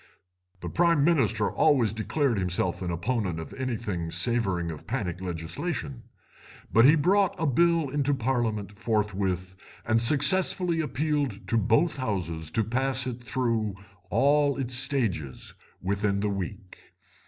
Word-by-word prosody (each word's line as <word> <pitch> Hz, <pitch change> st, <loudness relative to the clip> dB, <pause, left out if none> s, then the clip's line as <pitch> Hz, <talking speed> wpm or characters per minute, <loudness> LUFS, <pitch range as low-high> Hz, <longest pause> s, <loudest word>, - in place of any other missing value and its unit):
"The -, -, -5 dB
Prime 170 Hz, -4 st, +2 dB
Minister 115 Hz, -10 st, +2 dB
always 130 Hz, -9 st, +2 dB
declared 115 Hz, +1 st, -1 dB
himself 90 Hz, -1 st, -1 dB
an 90 Hz, -, -3 dB
opponent 90 Hz, -1 st, -2 dB
of 80 Hz, -, -8 dB
anything 110 Hz, -10 st, -3 dB
savouring 95 Hz, -6 st, 0 dB
of 80 Hz, -, -10 dB
panic 95 Hz, -8 st, -3 dB
legislation, 120 Hz, -, -4 dB, 0.7 s
but 115 Hz, +2 st, +6 dB
he 150 Hz, +4 st, +7 dB
brought 190 Hz, +5 st, +2 dB
a 160 Hz, -, 0 dB
Bill 165 Hz, +3 st, +2 dB
into 140 Hz, +1 st, 0 dB
Parliament 115 Hz, -5 st, -1 dB
forthwith 100 Hz, -4 st, -2 dB, 0.3 s
and 115 Hz, 0 st, +2 dB
successfully 165 Hz, +6 st, +4 dB
appealed 145 Hz, -5 st, -2 dB
to -, -, +1 dB
both 115 Hz, -, +2 dB
Houses 85 Hz, -, -3 dB
to 115 Hz, -, 0 dB
pass 130 Hz, +4 st, 0 dB
it 125 Hz, -1 st, -6 dB
through 115 Hz, -3 st, -1 dB, 0.3 s
all 145 Hz, 0 st, +2 dB
its 130 Hz, -2 st, -2 dB
stages 120 Hz, -, 0 dB, 0.3 s
within 100 Hz, +1 st, 0 dB
the 105 Hz, -, 0 dB
week. 100 Hz, 0 st, -6 dB
115 Hz, 130 wpm, -27 LUFS, 100-140 Hz, 0.7 s, he